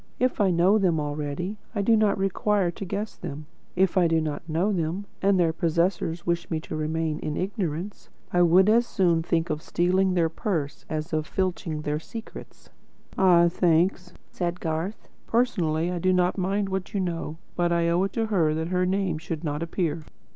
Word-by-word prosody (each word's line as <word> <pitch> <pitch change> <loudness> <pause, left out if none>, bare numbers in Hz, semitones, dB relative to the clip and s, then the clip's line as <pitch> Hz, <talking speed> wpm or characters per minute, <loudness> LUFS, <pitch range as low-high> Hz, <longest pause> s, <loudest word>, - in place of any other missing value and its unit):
If 255 -3 +1
I 195 - +4
know 180 +5 +4
them 175 -5 +2
already, 150 +7 -3 0.2
I 205 - 0
do 225 +3 +4
not 215 -2 +3
require 195 -1 +1
to 195 - -7
guess 205 +4 -4
them. 150 -3 -7 0.3
If 190 +1 +2
I 175 - +4
do 165 0 +2
not 155 -2 -3
know 175 +7 +1
them, 175 +3 -2 0.2
and 195 -1 +3
their 165 -2 +3
possessors 170 0 0
wish 170 0 -1
me 160 - -1
to 155 - -6
remain 155 0 -1
in 150 - -3
ignorance, 190 -1 -3 0.2
I 175 - +4
would 180 +3 +5
as 235 +2 +4
soon 170 -4 +2
think 165 +1 0
of 150 - -2
stealing 185 +2 +1
their 170 -2 +3
purse 160 -3 -3
as 155 +2 -4
of 155 -1 0
filching 175 -5 -2
their 150 0 -1
secret." 225 +7 -10 0.4
"Ah, 175 -2 +5
thanks," 175 +1 +1 0.2
said 175 0 -3
Garth. 165 +5 -3 0.2
"Personally, 175 -9 +1
I 180 - -2
do 185 +2 +2
not 180 0 +2
mind 195 +1 -1
what 190 +1 -4
you - - +1
know. 165 -4 -3 0.2
But 175 -1 +1
I 170 0 +2
owe 170 +2 +2
it 195 - -5
to 225 - 0
her, 170 -8 +1
that 160 +1 -2
her 180 0 +1
name 185 -4 0
should 165 0 -5
not 150 -1 -2
appear." 165 -1 -2
175 Hz, 190 wpm, -26 LUFS, 160-190 Hz, 0.4 s, would